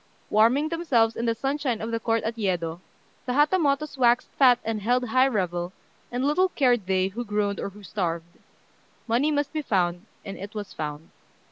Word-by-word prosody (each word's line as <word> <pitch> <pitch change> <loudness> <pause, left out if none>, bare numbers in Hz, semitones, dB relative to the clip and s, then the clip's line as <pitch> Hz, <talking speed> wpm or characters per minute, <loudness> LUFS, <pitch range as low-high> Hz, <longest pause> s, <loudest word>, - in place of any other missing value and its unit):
Warming 240 +8 +4
themselves 265 -10 +2
in 235 - -2
the 230 - +1
sunshine 270 -1 -1
of 225 +1 -4
the 230 - -1
court 225 0 0
at 225 +1 -2
Yedo, 175 -6 -2 0.5
the 250 - 0
Hatamotos 295 -1 +2
waxed 240 -1 +3
fat 255 -3 +5
and 220 -1 -2
held 245 +3 +1
high 260 +3 +4
revel, 180 -6 -2 0.4
and 250 +2 -1
little 365 +6 +3
cared 245 - +2
they 190 0 +1
who 230 +5 -5
groaned 210 -2 -1
or - - -3
who 205 +1 -15
starved. 170 -4 -4 0.7
Money 245 +6 +2
must 290 -1 -1
be 310 - -1
found, 180 -5 0 0.2
and 195 - -7
it 200 +2 -8
was 205 -1 -6
found. 150 0 -6
225 Hz, 180 wpm, -25 LUFS, 195-270 Hz, 0.7 s, fat